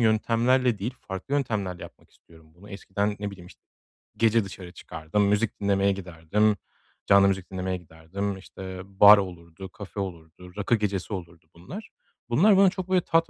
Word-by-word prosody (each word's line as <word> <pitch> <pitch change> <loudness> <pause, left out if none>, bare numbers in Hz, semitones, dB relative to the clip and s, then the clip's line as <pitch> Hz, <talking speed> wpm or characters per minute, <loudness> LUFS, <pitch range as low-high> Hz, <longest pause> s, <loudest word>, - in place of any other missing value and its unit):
yöntemlerle 115 +2 +2
değil, 115 +6 -4
farklı 95 +9 -5
yöntemlerle 105 -10 -2
yapmak - - -13
istiyorum 80 -1 -21
bunu. 100 +4 -15
Eskiden, 100 +1 -2
ne 105 0 -3
bileyim, 90 -3 -12
işt - - -16 0.6
gece 115 0 +3
dışarı 95 -2 -9
çıkardım, 80 +6 -2
müzik 105 +2 0
dinlemeye 100 0 +2
giderdim, 95 +3 0 0.5
canlı 100 0 +6
müzik 95 -1 -2
dinlemeye 95 0 -2
giderdim, 90 +4 -5
işte, 95 -1 -9
bar 100 +2 +8
olurdu, 90 -1 -6
kafe 100 +2 -9
olurdu, 90 -1 -7
rakı 105 +3 +2
gecesi 100 -2 -2
olurdu, 85 -3 -8
bunlar. 95 - -9 0.4
Bunlar 190 - +5
bana 195 0 +7
çok 185 0 -6
böyle 185 -1 +3
tat 165 0 +1
100 Hz, 160 wpm, -26 LUFS, 90-110 Hz, 0.6 s, bar